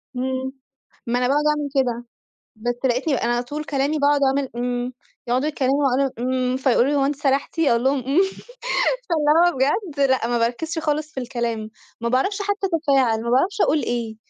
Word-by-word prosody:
إمم. 260 +1 -2 0.6
ما 245 +1 +1
أنا 250 - +1
باقعُد 290 +2 +2
أعمل 300 -1 0
كده. 245 -3 0 0.5
بس 240 +3 -2
لقيتني 260 +4 +1
أنا 240 0 0
على 240 +1 0
طول 295 +5 -5
كلامي 290 +1 -1
باقعُد 285 0 +3
أعمل 270 0 +1
إمم، 245 +1 -2 0.3
يقعُدوا 255 +4 +1
يتكلّموا 280 -1 +1
وأنا 270 +1 +1
إمم، 255 +1 0
فيقولوا 260 -1 +2
لي: 290 - +1
"هو 275 -1 +2
أنتِ 285 +1 0
سَرحتِ؟" 280 +3 -1
أقول 240 -7 +3
لهم: 270 +1 +2
"إمم." 285 +8 +3 0.9
فاللي 300 -3 +2 0.2
هو 330 - -8
بجد 290 - 0
لأ 260 -3 +2
ما 240 -1 +1
باركّزش 310 +9 -1
خالص 305 0 -1
في 265 - -4
الكلام، 235 -3 -3 0.3
ما 235 - -1
باعرفش 390 - 0
حتّى 405 -1 -1
أتفاعل، 270 -8 +2
ما 235 - -2
باعرفش 375 - +1
أقول 300 +1 +3
إيه، 230 -2 -3
265 Hz, 185 wpm, -22 LUFS, 245-295 Hz, 0.9 s, باقعُد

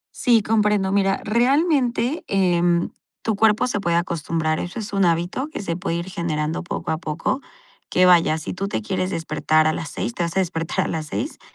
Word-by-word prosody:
Sí, 230 -4 +3
comprendo. 210 -3 +2
Mira, 195 -1 +1
realmente, 255 +3 +2
em, 175 -3 +2 0.3
tu 220 -2 0
cuerpo 220 +3 +3
se 240 -5 -1
puede 170 -3 0
acostumbrar, 165 -2 -1
eso 175 +6 -5
es 210 -2 -5
un 195 -2 +3
hábito 175 - 0
que 310 - -7
se 170 -3 -2
puede 180 -1 -2
ir 170 +1 -3
generando 160 -4 -2
poco 175 - -4
a 160 - 0
poco, 165 - -2 0.5
que 185 0 +4
vaya, 170 -3 +5
si 155 - -5
tú 195 +2 -3
te 110 - -3
quieres 185 - -1
despertar 155 -2 +1
a 155 - +3
las 160 - -5
6, 120 - -4
te - - -4
vas 170 +2 -2
a - - +5
despertar 165 -2 -1
a - - -2
las 155 -1 -3
6, 285 - -4
180 Hz, 205 wpm, -22 LUFS, 165-210 Hz, 0.5 s, vaya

